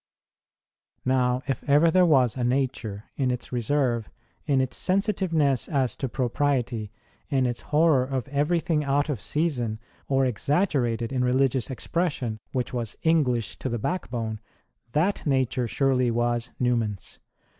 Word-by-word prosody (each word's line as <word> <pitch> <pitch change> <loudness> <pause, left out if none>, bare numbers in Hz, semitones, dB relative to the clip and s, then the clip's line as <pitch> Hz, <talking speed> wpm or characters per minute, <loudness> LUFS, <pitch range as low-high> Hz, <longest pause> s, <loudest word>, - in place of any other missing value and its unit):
Now, 130 -1 +2
if 135 -3 -2
ever 150 +4 +5
there 180 +1 +5
was 130 -7 +4
a 125 - -2
nature 120 -5 -2
in 130 -2 +1
its 125 -1 -4
reserve, 120 -2 0 0.4
in 140 -3 +3
its 130 -1 -1
sensitiveness 180 - +1
as 135 -5 +1
to 135 - -3
propriety, 125 -4 -1 0.4
in 135 -3 +2
its 120 -1 -2
horror 150 -3 +4
of 130 0 -3
everything 155 +2 +1
out 145 +2 +1
of 130 -8 -2
season 130 -9 -1 0.3
or 135 -1 +2
exaggerated 125 - 0
in 125 -1 +1
religious 130 0 +1
expression 130 -5 -2
which 125 -1 -2
was 120 -3 -3
English 130 - +1
to 130 - -4
the 120 - -1
backbone, 115 - -3 0.5
that 175 +7 +1
nature 130 -2 +1
surely 130 0 +2
was 120 +1 0
Newman 120 -4 +1
s. - - -15
130 Hz, 140 wpm, -26 LUFS, 120-145 Hz, 0.5 s, ever